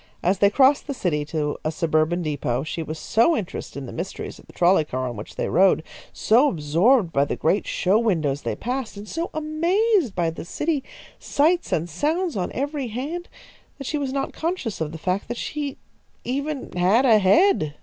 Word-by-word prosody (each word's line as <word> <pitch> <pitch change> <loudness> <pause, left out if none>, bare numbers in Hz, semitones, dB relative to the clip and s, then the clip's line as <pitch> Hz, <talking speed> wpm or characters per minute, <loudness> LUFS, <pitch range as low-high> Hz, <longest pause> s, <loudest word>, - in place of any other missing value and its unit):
As 190 +2 +2
they 200 - +5
crossed 270 +7 +4
the 280 - -3
city 155 -9 -1
to 150 -1 -2
a 155 - 0
suburban 160 +2 +1
depot, 135 -4 -1
she 155 +2 -4
was 155 0 -5
so 235 - +2
interested 185 -8 -6
in 140 - -5
the - - -8
mysteries - - -6
of - - -18
the - - -14
trolley 175 -1 +4
car 130 -3 -3
on 120 - -5
which 105 - -9
they - - -2
rode, 185 -2 +4 0.3
so 250 +7 +4
absorbed 170 - +2
by 140 - +3
the 145 - -2
great 185 +6 0
show 195 +4 +2
windows 155 -11 0
they - - -3
passed, 250 -3 -4
and 205 +1 -8
so 330 +7 -3
amazed 335 - +1
by 165 -2 +1
the 165 - -7
city 295 - -2 0.4
sights 335 +5 +1
and 165 +1 0
sounds 315 - -1
on 185 -3 -2
every 280 0 -2
hand, 290 - -5 0.5
that 275 - -8
she 300 +3 -2
was 275 -2 -2
not 275 0 -2
conscious 320 - -3
of 155 -1 -2
the 165 - -7
fact 185 +4 -2
that 240 - -4
she 290 0 -4 0.5
even 280 +2 -3
had 190 +9 +3
a 225 -4 +6
head. 195 - +3
210 Hz, 200 wpm, -23 LUFS, -, 0.5 s, a